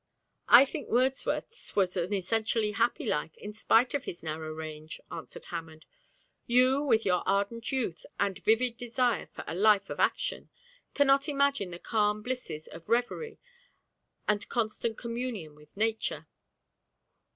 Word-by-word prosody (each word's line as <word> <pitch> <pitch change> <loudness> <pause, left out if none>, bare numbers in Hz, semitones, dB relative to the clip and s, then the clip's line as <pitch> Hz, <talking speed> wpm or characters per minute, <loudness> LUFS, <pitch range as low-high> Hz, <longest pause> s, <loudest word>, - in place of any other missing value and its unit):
'I 245 +4 +9
think 285 -1 -6
Wordsworth's 265 - 0
was 185 -3 +2
an 180 +1 -1
essentially 215 +2 0
happy 230 +3 0
life, 150 +2 -2
in 210 - -8
spite 225 +3 +3
of 285 -1 -2
his 170 - -7
narrow 155 0 -4
range,' 155 0 -7
answered - - -8
Hammond. 160 -2 -7 0.6
'You, 255 +3 +4
with 230 -6 +2
your 180 -2 +2
ardent 200 +4 0
youth 230 -11 -2
and 195 -3 0
vivid 230 +2 +2
desire 245 -1 0
for - - -9
a - - -5
life 200 +1 +3
of - - -5
action, - - 0 0.5
cannot 275 0 +4
imagine 280 -8 +1
the 170 - -7
calm 210 +1 0
blisses 245 -11 -4
of 165 - -12
reverie 245 - 0 0.9
and 210 -1 0
constant 225 -1 -1
communion 230 -9 -4
with 150 +5 -20
nature. 220 +1 -1
220 Hz, 140 wpm, -29 LUFS, 180-245 Hz, 0.9 s, I